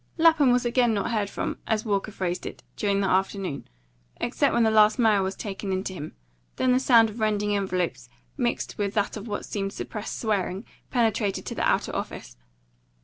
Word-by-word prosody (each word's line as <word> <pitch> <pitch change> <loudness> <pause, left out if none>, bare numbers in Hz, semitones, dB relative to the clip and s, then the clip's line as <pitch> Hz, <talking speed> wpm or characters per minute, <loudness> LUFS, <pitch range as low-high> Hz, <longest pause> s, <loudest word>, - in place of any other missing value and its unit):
Lapham 320 -5 +5
was 245 0 +3
not 240 - 0
again 240 -2 +3
heard 205 0 -1
from, - - -4
as 220 0 0
Walker 205 0 -1
phrased 180 -3 -3
it, - - -9
during 200 -1 +1
the 195 - +1
afternoon, 190 -4 -1 0.5
except 275 +3 +1
when 235 - +3
the 220 - +3
last 215 0 +5
mail 220 -5 +4
was 190 0 -2
taken 195 -1 -5
in 190 0 -1
to 190 - -4
him; 155 -4 -7 0.4
then 255 - +2
the 250 - +4
sound 230 -4 +5
of 220 - -10
rending 210 -1 +1
envelopes, 185 -9 -2 0.3
mixed 240 -4 -2
with 200 0 -1
that 205 -1 0
of 215 +1 -7
what 205 -1 -4
seemed 195 -1 -3
suppressed 215 -1 -5
swearing, 200 -2 -1 0.2
penetrated 220 -4 0
to - - -4
the - - -4
outer - - 0
office. - - -5
210 Hz, 195 wpm, -26 LUFS, 195-230 Hz, 0.5 s, Lapham